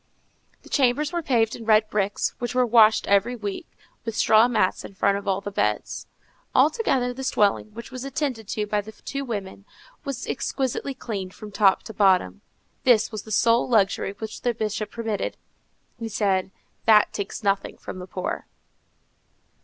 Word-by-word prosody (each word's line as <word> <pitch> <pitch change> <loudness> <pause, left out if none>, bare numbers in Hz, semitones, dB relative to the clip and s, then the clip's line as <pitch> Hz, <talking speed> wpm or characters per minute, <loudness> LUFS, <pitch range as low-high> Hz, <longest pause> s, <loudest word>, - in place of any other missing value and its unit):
The - - -15
chambers 285 +4 +2
were 345 - 0
paved 235 -7 +1
in 230 - -9
red 215 -1 +4
bricks, 205 -1 0
which 245 0 -3
were 255 0 +4
washed 225 -2 +5
every 200 +5 +2
week, 205 -4 -5 0.4
with 225 -2 -4
straw 220 +2 +5
mats 205 -6 +1
in 195 - -10
front 200 +1 +2
of 200 - -12
all 195 0 +1
the 205 - -5
beds. 105 - -1 0.5
Altogether, 265 - +2
this 265 +1 -2
dwelling, 205 0 +2
which 235 +3 -9
was 255 -1 -6
attended 270 -5 -3
to 210 +1 -2
by 210 0 0
the 220 +2 -11
two 275 +4 -5
women, 200 -6 -5 0.4
was 275 -3 -4
exquisitely 270 +1 -2
clean 205 -7 -5
from 210 +3 -11
top 200 -2 +3
to 220 - -9
bottom. 190 - +3 0.4
This 240 -4 +4
was 215 -2 -5
the 220 - -12
sole 230 +4 +3
luxury 200 -3 +2
which 220 +1 -7
the 240 -2 0
Bishop 215 -1 -2
permitted. 225 -4 -3 0.6
He 230 -1 -4
said, 195 -3 +1 0.4
_"That 215 -1 +6
takes 200 +1 -5
nothing 195 -1 0
from 185 - -8
the 180 - -8
poor." 185 0 -4
220 Hz, 170 wpm, -24 LUFS, 200-245 Hz, 0.6 s, That